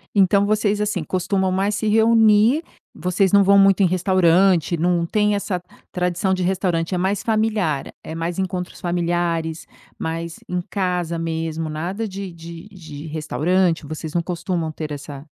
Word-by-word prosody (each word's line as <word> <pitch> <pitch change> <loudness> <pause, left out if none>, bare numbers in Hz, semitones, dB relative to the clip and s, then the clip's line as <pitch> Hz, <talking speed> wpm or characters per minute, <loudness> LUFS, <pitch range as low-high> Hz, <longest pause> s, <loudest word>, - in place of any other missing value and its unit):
Então, 200 +1 +4
vocês, 210 0 +1
assim, 205 -6 -1
costumam 190 +1 0
mais 200 +2 0
se 220 - -2
reunir. 225 +5 +4 0.3
Vocês 180 +3 0
não 200 -1 +6
vão 200 +1 +5
muito 195 0 +5
em - - +5
restaurante, 185 -1 +3
não 170 0 +1
têm 210 +2 +1
essa 185 -3 -3 0.3
tradição 180 +1 0
de 185 - -2
restaurante 180 -2 0
é 180 - +1
mais 190 +2 0
familiar, 215 -10 0
é 160 - -7
mais 165 +1 -3
encontros 185 -1 -4
familiares, 170 -2 -1 0.3
mais 165 +1 -5
em 180 0 -1
casa 180 -4 -1
mesmo, 165 -1 -3
nada 180 +8 -3
de 195 -1 -6
de 170 +2 -10
de 160 -6 -10
restaurante, 160 +2 0
vocês 155 +1 -6
não 170 - +1
costumam 170 -2 -3
ter, 155 -1 -6
essa 145 -1 -7
180 Hz, 155 wpm, -21 LUFS, 165-195 Hz, 0.3 s, não